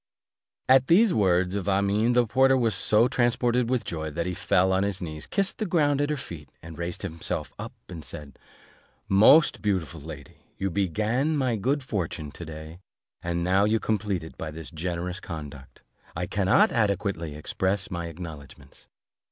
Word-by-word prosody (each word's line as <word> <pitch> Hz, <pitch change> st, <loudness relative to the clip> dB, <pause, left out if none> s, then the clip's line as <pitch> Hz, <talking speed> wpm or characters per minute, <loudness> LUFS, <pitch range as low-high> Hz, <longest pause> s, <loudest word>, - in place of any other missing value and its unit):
At 130 Hz, 0 st, +5 dB
these 195 Hz, +4 st, +5 dB
words 90 Hz, -3 st, +2 dB
of 100 Hz, -2 st, -3 dB
Amene, 100 Hz, +4 st, +2 dB
the 125 Hz, -1 st, +4 dB
porter 130 Hz, +3 st, +4 dB
was 115 Hz, -4 st, +1 dB
so 105 Hz, +4 st, +3 dB
transported 120 Hz, 0 st, +1 dB
with 125 Hz, -3 st, 0 dB
joy, 80 Hz, -2 st, -4 dB
that 85 Hz, +3 st, -3 dB
he 90 Hz, -, -2 dB
fell 95 Hz, +1 st, +2 dB
on 95 Hz, -, +2 dB
his 100 Hz, -1 st, -1 dB
knees, 80 Hz, -3 st, -6 dB
kissed 195 Hz, -1 st, -1 dB
the 215 Hz, -, -1 dB
ground 145 Hz, -5 st, +2 dB
at 145 Hz, -, 0 dB
her 150 Hz, -, -1 dB
feet, 80 Hz, -, -9 dB
and 80 Hz, 0 st, -10 dB
raising 85 Hz, +2 st, -4 dB
himself 80 Hz, 0 st, -4 dB
up, -, -, -6 dB, 0.3 s
said, 70 Hz, 0 st, -9 dB, 0.7 s
"Most 110 Hz, +11 st, +6 dB
beautiful 95 Hz, -10 st, -1 dB
lady, 75 Hz, -3 st, -10 dB, 0.2 s
you 95 Hz, -1 st, -2 dB
began 110 Hz, -, 0 dB
my 130 Hz, -4 st, +1 dB
good 135 Hz, +7 st, 0 dB
fortune 85 Hz, -, -4 dB
to 85 Hz, -, -9 dB
day, 80 Hz, +2 st, -9 dB, 0.4 s
and 85 Hz, 0 st, -2 dB
now 95 Hz, +3 st, +3 dB
you 110 Hz, +2 st, +2 dB
complete 105 Hz, -6 st, -1 dB
it 80 Hz, -, -12 dB
by 80 Hz, -, -4 dB
this 80 Hz, +2 st, -8 dB
generous 90 Hz, +2 st, -4 dB
conduct; 75 Hz, -6 st, -9 dB, 0.3 s
I -, -, -2 dB
cannot -, -, +3 dB
adequately 100 Hz, -7 st, -1 dB
express 95 Hz, +6 st, -2 dB
my 85 Hz, -1 st, -3 dB
acknowledgments. 75 Hz, -5 st, -10 dB
95 Hz, 170 wpm, -26 LUFS, 80-115 Hz, 0.7 s, Most